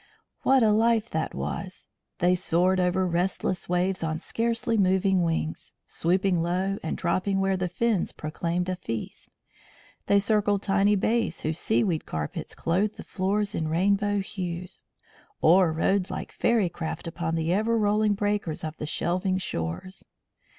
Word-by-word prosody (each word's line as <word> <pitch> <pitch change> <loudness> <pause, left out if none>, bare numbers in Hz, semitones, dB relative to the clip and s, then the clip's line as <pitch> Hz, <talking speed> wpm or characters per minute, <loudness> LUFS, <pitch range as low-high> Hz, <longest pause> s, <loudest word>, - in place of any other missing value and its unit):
What 265 -2 +4
a 215 - +5
life 225 +1 +2
that - - -2
was! - - -5 0.3
They 180 0 +3
soared 180 +1 +2
over 180 +1 +2
restless 180 +1 -1
waves 180 +2 0
on 160 -1 -1
scarcely 230 +5 -1
moving 190 -1 +3
wings, 165 -2 -2
swooping 180 +1 +1
low 185 +4 -1
and 160 - -3
dropping 185 +3 0
where 195 0 +2
the 185 -1 -1
flash 175 - -13
of - - -33
fins 230 -6 +1
proclaimed 170 +3 -3
a 185 - -1
feast. 115 -11 -6 0.8
They 200 - +5
circled 205 -1 +2
tiny 200 +1 +3
bays 220 -2 0
whose 155 +2 -2
seaweed 190 -7 0
carpets 75 -1 -4
clothed 195 +6 0
the - - -7
floors 205 +2 -1
in 160 - -1
rainbow 200 +5 +1
hues; 180 -2 -6 0.6
or 175 +1 +5
rode 185 +4 +1
like - - -5
fairy 225 -5 +2
craft 160 -1 -5
upon 165 -1 -3
the 165 +1 0
ever 220 +4 +2
rolling 210 0 +2
breakers 205 -6 -1
on 155 -1 -3
the 150 - -4
shelving 185 +4 0
shores. 90 - -5
185 Hz, 155 wpm, -26 LUFS, 170-205 Hz, 0.8 s, a